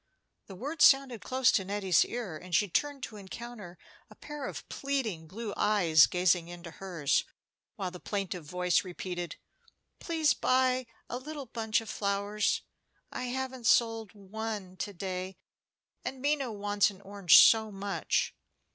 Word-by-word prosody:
The 195 - -9
words 290 - -1
sounded 270 -5 +5
close 255 0 +3
to 195 - +2
Nettie's 195 -3 +2
ear, 230 -9 -5
and 180 +2 -4
she 205 - +3
turned 280 +8 -1
to 220 - -6
encounter 205 -2 -9 0.3
a - - -15
pair 295 -2 -7
of - - -7
pleading 235 - -3
blue 210 +3 -6
eyes 175 -8 +5
gazing 180 -1 +2
into 175 -1 -9
hers, 170 -7 0 0.5
while 185 -2 -4
the 180 - -9
plaintive 190 -4 -3
voice 180 +3 +1
repeated, 175 -1 -5 0.6
"Please 320 -3 +2
buy 255 -1 +2 0.2
a 245 - -4
little 290 +1 -7
bunch 225 -1 -1
of 225 - -10
flowers; 200 +1 0 0.5
I 250 - -4
haven't 260 -1 -3
sold 225 -4 +3
one 205 -1 -6
to 205 - -4
day, 185 0 -5 0.7
and 265 - -5
Minna 280 -2 0
wants 205 0 +1
an 195 -1 -13
orange 195 -4 +5
so 220 -1 +7
much." 200 0 -1
205 Hz, 145 wpm, -30 LUFS, 185-250 Hz, 0.7 s, so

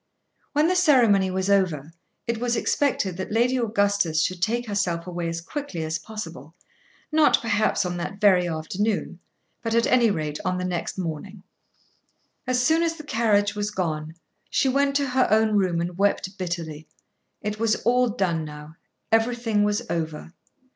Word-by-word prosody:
When 300 +2 +3
the 365 - +2
ceremony 240 - +4
was 190 +1 -1
over 170 -7 +1 0.3
it 230 -1 -2
was 240 0 0
expected 205 -10 0
that 190 - -5
Lady 240 +4 +2
Augustus 200 -8 +1
should 185 -1 -2
take 235 +5 0
herself 190 -6 -1
away 175 -2 -3
as 165 0 -4
quickly 235 - -5
as 160 +1 -2
possible, 165 -6 -8 0.6
not 310 0 +4
perhaps 215 -3 +1
on 175 0 -3
that 195 +3 -5
very 185 -4 +4
afternoon, 180 +4 -2 0.4
but 230 -1 -1
at 230 - +3
any 240 -3 +4
rate, 155 -6 -2
on 185 -1 -1
the 180 - -2
next 180 0 -3
morning. 185 +3 -5 1.0
As 255 -1 +1
soon 320 +4 +3
as 330 -1 0
the 310 - -10
carriage 210 -6 +2
was 205 0 -2
gone, 160 -5 -3 0.3
she - - +2
went 275 +1 +2
to 280 -1 +1
her 255 0 +2
own 220 +1 +3
room 185 -4 +2
and 175 +1 -4
wept 200 -1 +1
bitterly. 165 -4 -5 0.6
It 210 0 -3
was 225 -1 +2
all 250 +1 +3
done 180 -7 -1
now. 150 +1 -10 0.3
Everything 225 -1 +2
was 210 +3 0
over. 160 -2 -4
200 Hz, 165 wpm, -24 LUFS, 170-230 Hz, 1.0 s, ceremony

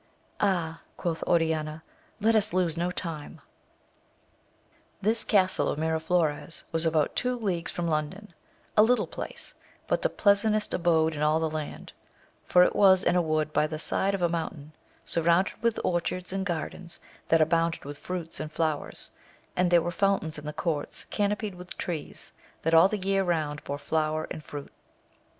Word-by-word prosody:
Ah, 170 -5 0 0.2
quoth 165 -2 -2
Oriaia, 160 -2 +1 0.4
let 225 +2 +3
us 210 -2 +3
lose 180 -3 +1
no 175 +1 0
time. 165 -4 -6 1.6
This 220 +3 +3
castle 190 -3 +4
of - - -2
Miraflores 160 0 0
was 165 0 +1
about 155 -2 +1
two 250 0 0
leagues 185 -7 -2
from 175 -1 -2
London,~^a 170 +6 -2
little 245 +2 +3
place, - - -6 0.3
but - - 0
the - - +2
pleasantest 210 +1 +2
abode 160 -2 +2
in 150 - -5
all 155 +1 +3
that 160 -1 -1
land, 155 -1 -6 0.5
for 180 - +6
it - - +1
was 190 -1 +6
in - - +2
a 180 - +4
wood 155 -2 0
by 150 - +3
the 155 0 -5
side 195 +5 0
of 185 - -3
a - - +5
moun 165 -1 -1
tain, 150 0 -13 0.3
surrounded 170 +3 +1
with 235 -1 +1
orchards 180 +1 -1
and 195 0 -2
gardens 170 0 -5 0.3
that 165 - +4
abounded 165 0 +1
with 145 0 -6
fruits 175 -3 -5
and 155 0 -5
flowers, 155 -1 -2 0.4
and 180 0 +2
there 175 -2 +5
were 175 - -2
fountains 175 -4 0
in 150 - -9
the - - -2
courts 150 -2 -3
canopied 205 0 -1
with 180 0 -10
trees, 165 -4 -3 0.3
that 165 - +1
all 165 +3 +8
the 215 - -2
year 195 0 +1
round 155 -5 -1
bore 140 - -3
flower 155 +1 -1
and 155 - -6
fruit. 145 -1 -8
170 Hz, 170 wpm, -28 LUFS, 155-190 Hz, 1.6 s, all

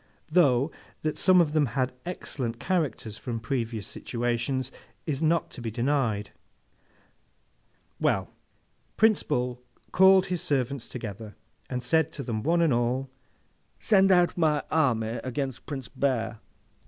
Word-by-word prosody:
Though, 145 -4 +4 0.3
that 155 -1 0
some 185 -1 +5
of 155 -3 +3
them 150 -3 +3
had 130 -1 +1
excellent 125 -9 -4
characters 135 - -2
from 120 -3 -4
previous 115 -2 -3
situations 120 +2 -2 0.3
is 150 -2 -2
not 165 0 +1
to 125 - -8
be 115 - -3
denied. 120 -3 0 1.7
Well; - - +1 0.7
Prince 220 -2 +4
Bull 125 -3 -2 0.3
called 190 0 +6
his 180 -2 -2
servants 135 -2 -1
together, 110 -3 -7 0.3
and 125 -1 -3
said 160 +4 +2
to 140 - -5
them 115 -3 -3
one 170 +7 +2
and 160 -5 +3
all, 125 +3 0 0.7
'Send 195 -2 +4
out 175 -1 +4
my 155 -4 +2
army 120 -7 +1
against 130 -1 -4
Prince 135 -4 -5
Bear. 120 -5 -1
130 Hz, 130 wpm, -27 LUFS, 120-160 Hz, 1.7 s, called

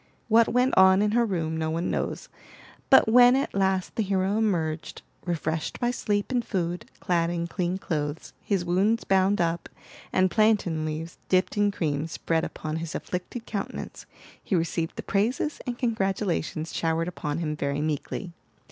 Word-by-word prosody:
What 230 +1 +6
went 250 +2 +2
on 190 +1 +6
in 210 - +1
her 235 +1 +3
room, 165 -5 -2
no 160 0 -1
one 165 +2 -1
knows; - - -3 0.6
but 265 - +7
when 245 +2 +7
at 270 - -1
last 190 -1 0
the - - +1
hero 195 -1 0
emerged, 170 -8 -1 0.2
refreshed 160 -2 -2
by 240 -1 +1
sleep 205 -2 -1
and 245 -2 +1
food, 175 -5 -3
clad 170 -2 +1
in 170 -1 -2
clean 180 +1 -2
clothes, 150 -4 -4
his 195 -4 -1
wounds 195 +6 +2
bound 195 +1 +2
up, 170 0 -1 0.4
and 185 -1 +2
plantain 205 -8 +2
leaves 155 +2 -5
dipped 185 0 +2
in 205 0 +3
cream 155 -5 -1
spread 165 0 -1
upon 155 0 -4
his 165 0 -5
afflicted 185 +6 -5
countenance, 200 -4 -5 0.4
he 195 - 0
received 165 -1 -1
the - - -6
praises 235 +9 0
and 240 -1 -3
congratulations 195 - -1
showered 165 0 0
upon 150 -4 -3
him 155 -3 -2
very 140 -1 -2
meekly. 155 +4 -3
185 Hz, 165 wpm, -26 LUFS, 165-210 Hz, 0.6 s, but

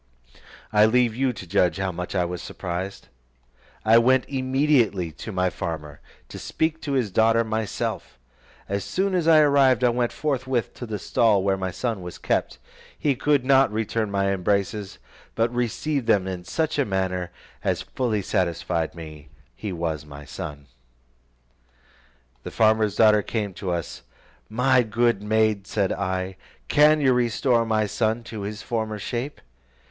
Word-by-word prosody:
I 105 0 +6
leave 120 -1 +2
you 130 +1 +1
to 110 - -9
judge 90 -1 +2
how 95 -1 -1
much 90 +2 -6
I 90 -2 +2
was 90 0 -5
surprised. 90 +2 -5 0.8
I 115 +2 +7
went 130 +2 +3
immediately 130 - +1
to 80 +8 -8
my 90 -2 0
farmer, 75 -4 -6 0.3
to - - -8
speak 160 0 -2
to 140 - -3
his 125 -7 0
daughter 115 +3 +3
myself. 110 - -3 0.5
As 100 0 -2
soon 190 - -1
as 175 -3 +1
I 160 -1 +7
arrived, 135 -4 +4
I 125 - +5
went 120 0 0
forthwith 130 -5 -2
to 120 - -8
the 110 -1 -3
stall 105 -1 +2
where 100 0 +2
my 95 -1 -3
son 100 +2 -3
was 90 -1 -8
kept; - - -1 0.4
he 145 - +1
could 140 0 +1
not 135 -3 +5
return 110 0 -1
my 100 0 +1
embraces, 100 +1 -1 0.4
but 115 +1 +1
received 125 +3 -1
them 95 -2 +3
in 90 -2 -5
such 160 - -1
a - - +4
manner, 95 -3 -1 0.3
as - - 0
fully 110 -6 -2
satisfied 85 -4 -1
me 75 -3 -10 0.3
he 105 - -5
was 80 -4 -3
my 75 -1 -11
son. 70 0 -7 1.8
The - - -7
farmer's 110 -2 +2
daughter 110 -1 +6
then - - -18
came 105 -4 -2
to 95 0 -5
us: 85 -3 -3 0.5
"My 125 +2 +3
good 115 -1 +1
maid," 110 -2 +1
said 100 -2 0
I, 95 -1 -3 0.3
"can 150 +1 +5
you 130 -2 +4
restore 120 0 +1
my 110 -1 +2
son 110 +2 -1
to 110 -2 -7
his 105 +2 -5
former 110 -2 -2
shape?" 120 +8 -4
110 Hz, 160 wpm, -24 LUFS, 95-125 Hz, 1.8 s, I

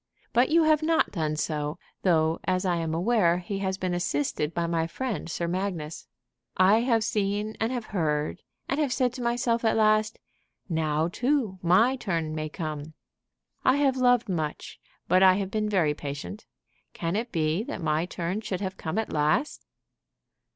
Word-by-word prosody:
But 245 +2 +4
you 330 +1 +5
have 310 -1 +4
not 320 +1 +2
done 155 -4 -1
so, 150 -1 -2 0.2
though, 160 -3 +2
as 185 0 0
I 175 -2 +1
am 165 -1 -2
aware, 175 -2 +3
he 195 +2 -4
has 190 -1 -1
been 185 -2 -2
assisted 150 -3 -1
by 170 0 -1
my 165 -1 0
friend 225 +1 -4
Sir 170 +1 -2
Magnus. 175 -4 -3 0.5
I 195 +4 +5
have 230 -2 +2
seen, 210 0 -1
and 225 +2 0
have 245 -3 -3
heard, 155 -3 -1 0.3
and 275 - -1
have 290 -4 +1
said 250 -1 +1
to 250 - -7
myself 235 -1 0
at 225 -1 +2
last, 215 0 +3 0.5
'Now, 160 -2 0
too, 240 -1 0
my 220 +10 +4
turn 165 -9 -2
may 155 0 -3
come.' 155 -2 -6 0.7
I 260 - +4
have 280 -2 +2
loved 245 -2 +3
much, 160 -6 -4 0.3
but 185 - +4
I 185 -1 +7
have 195 -1 -3
been 215 -1 -1
very 170 -8 +2
patient. 145 +8 -7 0.5
Can 170 +2 -2
it 230 +3 -2
be 160 +3 0
that - - -5
my 160 0 0
turn 180 +4 -3
should 205 -4 -3
have 190 -1 -4
come 160 +4 -4
at 220 - -2
last?" 155 - 0
185 Hz, 175 wpm, -27 LUFS, 160-225 Hz, 0.7 s, I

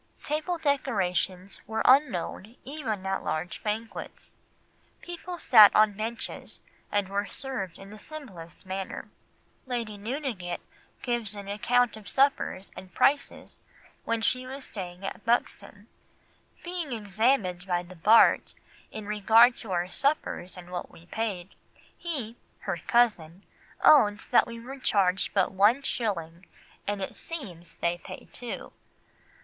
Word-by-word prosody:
Table 310 +4 -1
decorations 195 - -1
were 220 +1 -1
unknown 240 - +3
even 250 -9 -4
at 195 0 -1
large 165 +2 -3
banquets, 220 +2 -5 0.7
people 350 0 -7
sat 220 -10 +8
on 215 -1 +5
benches 225 +3 -5 0.3
and 205 -2 +1
were 200 +1 -2
served 255 -10 -4
in 195 +1 -12
the 215 - -11
simplest 205 - -10
manner. 190 0 -5 0.6
Lady 230 -5 -3
Newdigate 220 - -4 0.4
gives 235 -4 -2
an 200 -1 -8
account 245 +4 +2
of 215 -2 -10
suppers 270 -8 +1
and 185 - -11
prices 280 +1 +1 0.4
when 230 0 -1
she 255 +2 +1
was 270 +1 -6
staying 185 -3 -7
at 195 - -6
Buxton— 205 -3 -1 0.8
"Being 345 -6 -4
examined 205 -3 +1
by 175 -1 0
the 180 +1 -13
Bart 215 +7 +5 0.3
in 215 -1 -7
regard 220 +4 +5
to 220 - -6
our 175 0 0
suppers 230 - -1
and 180 0 -11
what 180 - -4
we 165 - -16
paid, 200 -3 -4 0.4
he 260 -10 -5 0.2
[her 195 -4 -2
cousin] 200 -7 +2 0.4
owned 210 -9 +6
that 245 - +5
we 230 0 -7
were 265 +4 -9
charged 195 -6 +1
but 195 -2 +3
one 210 +8 +4
shilling 180 -8 -3 0.4
and 205 -1 -1
it - - -6
seems 180 - -8
they 170 0 0
pay - - -10
two. 245 -1 -7
210 Hz, 135 wpm, -28 LUFS, 190-250 Hz, 0.8 s, sat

